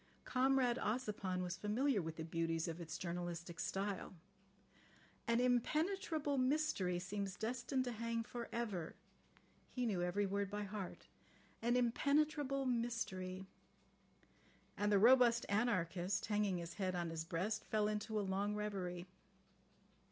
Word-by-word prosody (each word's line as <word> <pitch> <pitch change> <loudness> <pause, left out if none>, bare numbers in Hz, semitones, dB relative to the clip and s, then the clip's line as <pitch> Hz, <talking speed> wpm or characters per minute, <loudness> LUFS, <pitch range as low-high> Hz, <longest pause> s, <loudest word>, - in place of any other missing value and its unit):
Comrade 260 -1 +3
Ossipon 210 -5 -1
was 180 0 -3
familiar 215 +3 +1
with 160 -1 -4
the 160 - -4
beauties 165 0 -1
of 165 +1 -4
its 165 0 -5
journalistic 175 -1 -4
style. 195 -1 -2 1.1
"An 235 0 +3
impenetrable 300 +4 +1
mystery 255 - +2
seems 195 +1 -3
destined 255 +4 -1
to 250 - -2
hang 230 0 -2
for 235 0 -6
ever.... 205 -9 -3 0.4
" - - -31
He 250 -1 +1
knew 200 -6 0
every 180 +3 +1
word 200 0 -1
by 205 +1 -3
heart. 200 -2 -6 0.6
"An 240 +2 +3
impenetrable 280 +2 +2
mystery.... 225 -7 -1 0.7
" - - -31
And 205 0 +1
the 205 - +6
robust 235 +2 +6
anarchist, 190 -4 +1
hanging 205 -3 +1
his 170 0 -5
head 185 -2 -1
on 170 -1 -1
his 160 -1 -3
breast, 185 +7 -1
fell 215 -1 +1
into 215 +1 -1
a 205 - -1
long 200 +2 0
reverie. 185 -4 -3
210 Hz, 135 wpm, -39 LUFS, 180-240 Hz, 1.1 s, the